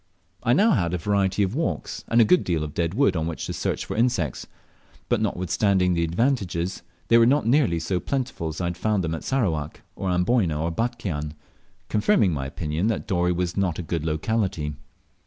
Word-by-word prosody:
I 120 Hz, -, -3 dB
had 125 Hz, -, +5 dB
now 205 Hz, -, +4 dB
a 90 Hz, +1 st, -1 dB
variety 100 Hz, +2 st, +1 dB
of 95 Hz, +1 st, -1 dB
walks, 160 Hz, +5 st, -3 dB
and 115 Hz, -, +3 dB
a 115 Hz, -, +7 dB
good 180 Hz, +11 st, +4 dB
deal 85 Hz, -3 st, -1 dB
of 75 Hz, -1 st, -6 dB
dead 85 Hz, +2 st, -1 dB
wood 140 Hz, -5 st, +3 dB
on 80 Hz, -1 st, -1 dB
which 85 Hz, -, -4 dB
to -, -, -4 dB
search -, -, -2 dB
for -, -, -5 dB
insects; 110 Hz, -, 0 dB, 0.6 s
but -, -, +2 dB
notwithstanding 90 Hz, +1 st, +1 dB
these 85 Hz, -1 st, +1 dB
advantages, 95 Hz, -3 st, -1 dB, 0.3 s
they 115 Hz, -, +7 dB
were 115 Hz, -, +6 dB
not 140 Hz, +1 st, +3 dB
nearly 120 Hz, -, +3 dB
so 90 Hz, +2 st, -1 dB
plentiful 130 Hz, -8 st, -3 dB
as 80 Hz, 0 st, -5 dB
I 90 Hz, -, -1 dB
had 85 Hz, 0 st, -3 dB
found 105 Hz, -3 st, 0 dB
them 80 Hz, -1 st, -2 dB
at 80 Hz, -, -5 dB
Sarawak, 80 Hz, -, -1 dB
or 95 Hz, -, -3 dB
Amboyna, 90 Hz, -3 st, +1 dB
or 85 Hz, +2 st, -1 dB
Batchian, 80 Hz, -9 st, -3 dB, 0.5 s
confirming 105 Hz, -, +2 dB
my 70 Hz, -3 st, -3 dB
opinion 75 Hz, +6 st, -2 dB
that 115 Hz, -3 st, -1 dB
Dorey 90 Hz, -1 st, +1 dB
was 90 Hz, 0 st, -1 dB
not 95 Hz, -5 st, 0 dB
a 90 Hz, -, -4 dB
good 80 Hz, 0 st, -3 dB
locality. 80 Hz, -1 st, -1 dB
90 Hz, 200 wpm, -24 LUFS, 80-115 Hz, 0.6 s, a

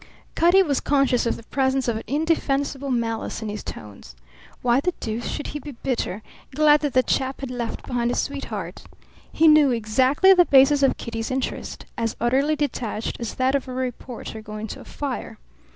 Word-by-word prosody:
Cutty 355 Hz, +3 st, +5 dB
was 285 Hz, -6 st, 0 dB
conscious 275 Hz, -4 st, +2 dB
of -, -, 0 dB
the -, -, -12 dB
presence 265 Hz, +2 st, 0 dB
of 235 Hz, -, +1 dB
an 220 Hz, -, -3 dB
indefensible 280 Hz, -2 st, 0 dB
malice 230 Hz, -2 st, -2 dB
in 215 Hz, -, -4 dB
his 210 Hz, 0 st, -5 dB
tones. 100 Hz, -12 st, -10 dB, 0.5 s
Why 245 Hz, +1 st, +3 dB
the 360 Hz, +5 st, -1 dB
deuce 225 Hz, +1 st, -4 dB
should 295 Hz, -, -4 dB
he 295 Hz, -, -4 dB
be 290 Hz, +1 st, -9 dB
bitter 230 Hz, -5 st, -3 dB, 0.3 s
glad 300 Hz, 0 st, +5 dB
that 290 Hz, -2 st, -2 dB
the 255 Hz, -, +4 dB
chap 265 Hz, +1 st, -1 dB
had 270 Hz, -2 st, -5 dB
left 240 Hz, -2 st, -4 dB
behind 240 Hz, -1 st, -1 dB
a 245 Hz, -, -1 dB
sweetheart? 280 Hz, 0 st, -4 dB, 0.5 s
He 325 Hz, -, +4 dB
knew 305 Hz, -2 st, +7 dB
exactly 255 Hz, -, +4 dB
the 355 Hz, -2 st, +5 dB
basis 275 Hz, 0 st, +5 dB
of 275 Hz, -, +3 dB
Kitty's 225 Hz, -1 st, -4 dB
interest, 260 Hz, 0 st, -4 dB
as 230 Hz, -1 st, -1 dB
utterly 270 Hz, +6 st, +2 dB
detached 250 Hz, -7 st, -3 dB
as 235 Hz, -3 st, -5 dB
that 260 Hz, +1 st, +1 dB
of 275 Hz, -1 st, -1 dB
a 255 Hz, -, -6 dB
reporter 250 Hz, -3 st, -5 dB
going 215 Hz, 0 st, -7 dB
to -, -, -7 dB
a -, -, -12 dB
fire. 280 Hz, -3 st, -5 dB
260 Hz, 185 wpm, -23 LUFS, 235-285 Hz, 0.5 s, knew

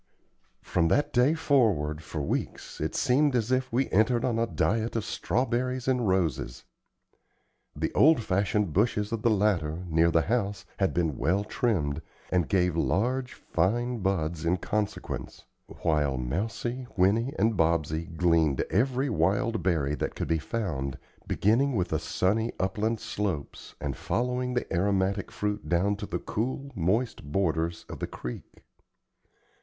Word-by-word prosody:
From 85 Hz, -2 st, +1 dB
that 145 Hz, -, +1 dB
day 125 Hz, +6 st, +4 dB
forward, 105 Hz, -, +2 dB
for 75 Hz, -1 st, -5 dB
weeks, -, -, -4 dB
it -, -, -2 dB
seemed 140 Hz, +2 st, +3 dB
as 120 Hz, 0 st, 0 dB
if 130 Hz, 0 st, +1 dB
we 125 Hz, +3 st, +1 dB
entered 115 Hz, +4 st, +3 dB
on 120 Hz, -3 st, 0 dB
a 115 Hz, -, +1 dB
diet 115 Hz, 0 st, 0 dB
of 110 Hz, -2 st, -1 dB
strawberries 125 Hz, +4 st, -1 dB
and 125 Hz, -4 st, +2 dB
roses. 80 Hz, -9 st, 0 dB, 1.1 s
The -, -, -2 dB
old 155 Hz, -5 st, +5 dB
fashioned 100 Hz, -2 st, 0 dB
bushes 105 Hz, 0 st, +1 dB
of 115 Hz, -2 st, -2 dB
the 120 Hz, -, +3 dB
latter, 90 Hz, -6 st, +1 dB
near 80 Hz, +1 st, +4 dB
the 80 Hz, -1 st, +3 dB
house, 100 Hz, -4 st, -1 dB
had 95 Hz, -1 st, +2 dB
been 80 Hz, -5 st, 0 dB
well 90 Hz, +8 st, +2 dB
trimmed, 85 Hz, -, -1 dB, 0.3 s
and 90 Hz, -4 st, +1 dB
gave 90 Hz, -3 st, +2 dB
large, 125 Hz, +10 st, 0 dB
fine 120 Hz, +8 st, 0 dB
buds 85 Hz, -5 st, -1 dB
in 85 Hz, +2 st, +2 dB
consequence, 105 Hz, +3 st, -4 dB, 0.2 s
while 75 Hz, -5 st, 0 dB
Mousie, 110 Hz, -, -3 dB
Winnie, 110 Hz, +8 st, +2 dB
and 110 Hz, +3 st, +2 dB
Bobsey 80 Hz, -1 st, +1 dB
gleaned 80 Hz, -5 st, +3 dB
every 130 Hz, +6 st, +1 dB
wild 100 Hz, -, +1 dB
berry 80 Hz, -6 st, +1 dB
that -, -, -3 dB
could -, -, -3 dB
be 80 Hz, -1 st, +2 dB
found, 75 Hz, -, -3 dB, 0.3 s
beginning 125 Hz, +6 st, +2 dB
with 90 Hz, -4 st, 0 dB
the 80 Hz, -, 0 dB
sunny 105 Hz, +7 st, 0 dB
upland 110 Hz, +3 st, 0 dB
slopes 105 Hz, -9 st, -4 dB
and 70 Hz, -3 st, -3 dB
following 125 Hz, +1 st, -1 dB
the 125 Hz, -, 0 dB
aromatic 95 Hz, +2 st, +1 dB
fruit 105 Hz, 0 st, -3 dB
down 95 Hz, +4 st, +2 dB
to 105 Hz, -, -6 dB
the -, -, -2 dB
cool, 130 Hz, +5 st, -3 dB
moist 105 Hz, +7 st, 0 dB
borders 85 Hz, -2 st, 0 dB
of -, -, -8 dB
the -, -, -2 dB
creek. -, -, -8 dB
100 Hz, 150 wpm, -28 LUFS, 85-120 Hz, 1.1 s, old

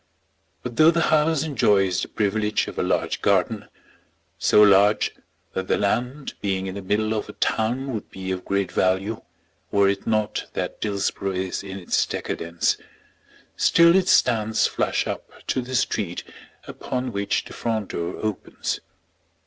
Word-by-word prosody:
But 120 Hz, -1 st, -6 dB
though 155 Hz, +1 st, +7 dB
the 170 Hz, 0 st, +2 dB
house 155 Hz, -1 st, +3 dB
enjoys 100 Hz, -, +2 dB
the -, -, -3 dB
privilege 105 Hz, 0 st, 0 dB
of -, -, -6 dB
a -, -, +2 dB
large -, -, 0 dB
garden, 100 Hz, +2 st, +1 dB, 0.7 s
so 105 Hz, -, +5 dB
large 100 Hz, +1 st, +5 dB, 0.4 s
that 95 Hz, 0 st, -3 dB
the -, -, +2 dB
land 125 Hz, +7 st, -1 dB
being 95 Hz, -1 st, -1 dB
in 95 Hz, -, -4 dB
the 100 Hz, -, -6 dB
middle 105 Hz, +3 st, 0 dB
of 110 Hz, -, -3 dB
a -, -, -7 dB
town 125 Hz, +4 st, -1 dB
would 110 Hz, -, -5 dB
be 95 Hz, 0 st, -5 dB
of 90 Hz, -1 st, -3 dB
great 100 Hz, -1 st, -1 dB
value 95 Hz, +4 st, 0 dB, 0.5 s
were 100 Hz, -1 st, +3 dB
it 100 Hz, 0 st, -1 dB
not 110 Hz, -1 st, 0 dB
that -, -, -4 dB
Dillsborough 100 Hz, -1 st, -1 dB
is 95 Hz, 0 st, -2 dB
in 95 Hz, -1 st, -7 dB
its 90 Hz, -, +1 dB
decadence, 85 Hz, +1 st, -1 dB, 0.8 s
still 170 Hz, +1 st, +5 dB
it 190 Hz, -1 st, +3 dB
stands 110 Hz, -, +3 dB
flush -, -, 0 dB
up -, -, -5 dB, 0.2 s
to 130 Hz, -, 0 dB
the 130 Hz, +1 st, -5 dB
street 100 Hz, -7 st, -1 dB, 0.4 s
upon 125 Hz, 0 st, -4 dB
which 100 Hz, -1 st, -1 dB
the -, -, -10 dB
front 110 Hz, -4 st, -2 dB
door 85 Hz, +1 st, -3 dB
opens. 110 Hz, -3 st, -3 dB
105 Hz, 155 wpm, -24 LUFS, 95-120 Hz, 0.8 s, though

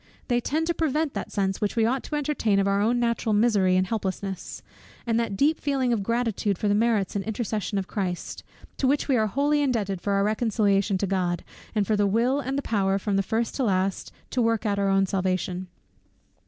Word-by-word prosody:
They 245 Hz, 0 st, +2 dB
tend 315 Hz, +6 st, -1 dB
to 340 Hz, -, 0 dB
prevent 310 Hz, -2 st, 0 dB
that -, -, -5 dB
sense 195 Hz, -2 st, -1 dB
which 210 Hz, -, -1 dB
we 225 Hz, -2 st, +3 dB
ought 255 Hz, +3 st, +1 dB
to 300 Hz, -, -4 dB
entertain 280 Hz, -8 st, +1 dB
of 195 Hz, 0 st, +2 dB
our 200 Hz, 0 st, +2 dB
own 235 Hz, +3 st, +2 dB
natural 235 Hz, -2 st, 0 dB
misery 205 Hz, -4 st, +3 dB
and 185 Hz, -, +2 dB
helplessness; 195 Hz, -2 st, -4 dB, 0.4 s
and 230 Hz, -1 st, +1 dB
that 220 Hz, -4 st, -2 dB
deep 305 Hz, +6 st, +2 dB
feeling 270 Hz, -4 st, 0 dB
of 220 Hz, -, 0 dB
gratitude 225 Hz, -3 st, 0 dB
for 210 Hz, -, -1 dB
the 205 Hz, -, +3 dB
merits 210 Hz, -3 st, +1 dB
and 200 Hz, -, -1 dB
intercession 215 Hz, -2 st, -2 dB
of 195 Hz, -, -1 dB
Christ, 185 Hz, -4 st, -4 dB, 0.3 s
to 265 Hz, -, +1 dB
which 280 Hz, +2 st, +1 dB
we 270 Hz, -, +3 dB
are 220 Hz, -2 st, +2 dB
wholly 290 Hz, +6 st, +1 dB
indebted 210 Hz, -9 st, -1 dB
for 200 Hz, -, -1 dB
our 195 Hz, 0 st, +2 dB
reconciliation 205 Hz, -2 st, +1 dB
to 200 Hz, -, -1 dB
God, 180 Hz, -3 st, -1 dB, 0.3 s
and 210 Hz, -2 st, +2 dB
for 215 Hz, -, +1 dB
the 205 Hz, -1 st, +2 dB
will 235 Hz, +7 st, +2 dB
and 270 Hz, -1 st, -2 dB
the 280 Hz, -, -2 dB
power, 195 Hz, -3 st, +1 dB
from 200 Hz, 0 st, -1 dB
first 225 Hz, +4 st, -1 dB
to 270 Hz, -, 0 dB
last, 190 Hz, -3 st, 0 dB, 0.2 s
to 255 Hz, -, +1 dB
work 230 Hz, -1 st, +1 dB
out 200 Hz, -1 st, 0 dB
our 200 Hz, 0 st, +1 dB
own 195 Hz, 0 st, +3 dB
salvation. 185 Hz, -1 st, -2 dB
215 Hz, 215 wpm, -25 LUFS, 195-240 Hz, 0.4 s, we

